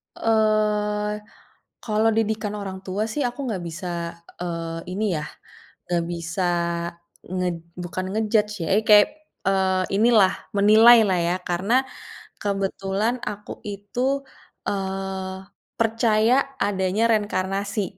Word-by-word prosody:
Eee, 210 -1 +1 0.6
kalau 220 0 +2
didikan 220 -1 0
orang 195 -2 -5
tua 195 +3 -1
sih 290 +4 -1
aku 245 +3 -7
nggak 190 -6 -3
bisa, 175 +3 -6 0.5
eee, 165 -1 -3
ini 215 +3 -1
ya, 150 - -4 0.6
nggak 170 -1 +1
bisa 170 +2 -3 0.8
nge 180 0 -1 0.3
bukan 180 +1 -4
nge-judge 215 -1 +1
ya, - - -3
eee, 215 - +3
kayak, 210 -1 +8 0.4
eee, 190 -1 +2 0.2
inilah 220 -4 +5 0.2
menilai 220 +4 +8
lah 185 -2 +2
ya 170 +2 +1
karena 185 +7 0 0.7
kebetulan 195 +2 -1
aku 210 0 -7
itu, 245 +7 -2 0.4
eee, 190 -1 -3 0.4
percaya 225 0 +3 0.3
adanya 195 +2 +1
reinkarnasi. 200 -1 0
205 Hz, 110 wpm, -24 LUFS, 190-215 Hz, 0.8 s, kayak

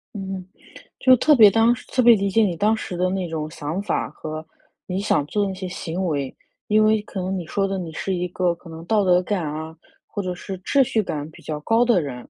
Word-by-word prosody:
嗯， 190 -1 -5 0.6
就 255 -1 +6
特 300 +5 +4
别 215 -5 +8
当 225 +3 +4
时 - - -12
特 255 - +1
别 235 -1 +8
理 200 -1 0
解 225 +3 +3
你 180 -4 0
当 215 +5 +2
时 180 - -6
的 180 +1 +1
那 185 -1 -2
种 155 -1 -4
想 160 +3 -4
法 - - -1
和 155 0 -7 0.4
你 185 0 -2
想 150 -7 +1
做 205 +4 0
那 190 - -3
些 185 0 -6
行 180 +1 -4
为。 140 -5 -2 0.3
因 215 0 +4
为 215 -1 +3
可 195 -2 -6
能 190 +1 -2
你 175 - -4
说 195 +2 0
的 195 0 -2
你 165 -2 -6
是 190 +4 -2
一 180 0 -2
个 180 -1 0
可 170 0 -14
能 165 +1 -9
道 210 0 +2
德 180 -1 +4
感 185 -1 -1
啊， 155 +2 -5 0.3
或 205 - -4
者 185 -1 -3
是 190 +2 -7
秩 275 +7 +3
序 220 -2 0
感 150 -4 -4
比 - - -16
较 150 -1 -4
高 230 +8 +3
的 235 -6 +3
人， 140 -5 -5
185 Hz, 265 characters per minute, -22 LUFS, 165-210 Hz, 0.6 s, 别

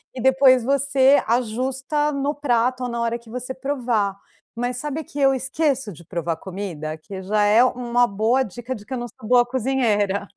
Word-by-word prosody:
e - - -6
depois 260 0 +5
você 275 +1 +3
ajusta 260 +6 0
no 280 +1 -1
prato 255 -3 0
ou - - -3
na 235 0 -3
hora 235 0 -1
que 235 -1 -18
você 250 +2 -5
provar." 245 -7 -1 0.4
Mas 245 0 -2
sabe 295 +3 -4
que 290 - -8
eu 270 -1 +4
esqueço 265 -3 -1
de 170 - -14
provar 170 -1 -3
comida, 175 -5 -6
que 190 +4 -9
já 210 +2 +1
é 210 +4 +5
uma 245 -1 +1
boa 220 +6 +1
dica 240 +2 -5
de 205 -3 -11
que - - -6
eu - - -2
não 240 - -4
sou 225 -1 -12
boa 245 -1 +5
cozinheira. 225 -6 0
245 Hz, 190 wpm, -22 LUFS, 215-265 Hz, 0.4 s, depois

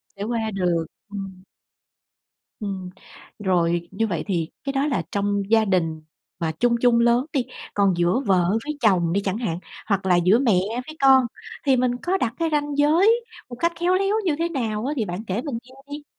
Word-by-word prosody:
Sẽ 200 - -5
qua 225 -1 -2
được, 175 -4 0 0.2
ừm. 195 -2 -7 1.2
Ừm, 190 -3 -4 0.5
rồi 175 -3 +1
như 225 +4 0
vậy 175 -6 -2
thì 170 -5 -1
cái 275 - -3
đó 275 +2 +1
là 245 - 0
trong 200 0 0
gia 220 -1 +5
đình 165 -5 0 0.4
mà 165 -2 -1
chung 240 -1 +3
chung 240 -1 +4
lớn 240 +2 +3
đi, 260 -4 +1 0.3
còn 200 -2 +3
giữa 175 +8 +2
vợ 180 -3 +3
với 300 0 -4
chồng 180 -6 +3
đi 200 - +1
chẳng 195 0 -2
hạn, 180 -8 -2 0.3
hoặc 200 -3 0
là 180 -2 +4
giữa 180 +6 +4
mẹ 225 -9 +3 0.3
với 310 0 -9
con, 265 -1 +6 0.4
thì 265 -2 +4
mình 250 0 +2
có 370 +2 +1
đặt 240 -8 -1
cái 330 -1 +1
ranh 290 -1 0
giới 375 +11 +4 0.2
một 240 - -7
cách 335 +4 +2
khéo 350 +2 +2
léo 390 +2 +1
như 315 -5 +2
thế 335 +1 0
nào 225 -6 -2
á? 290 - -1
Thì 220 - 0
bạn 180 +3 -5
kể 195 +5 -1
mình 265 -4 -4
nghe 255 - -18 0.2
đi! 290 +1 -6
220 Hz, 205 wpm, -23 LUFS, 185-275 Hz, 1.2 s, con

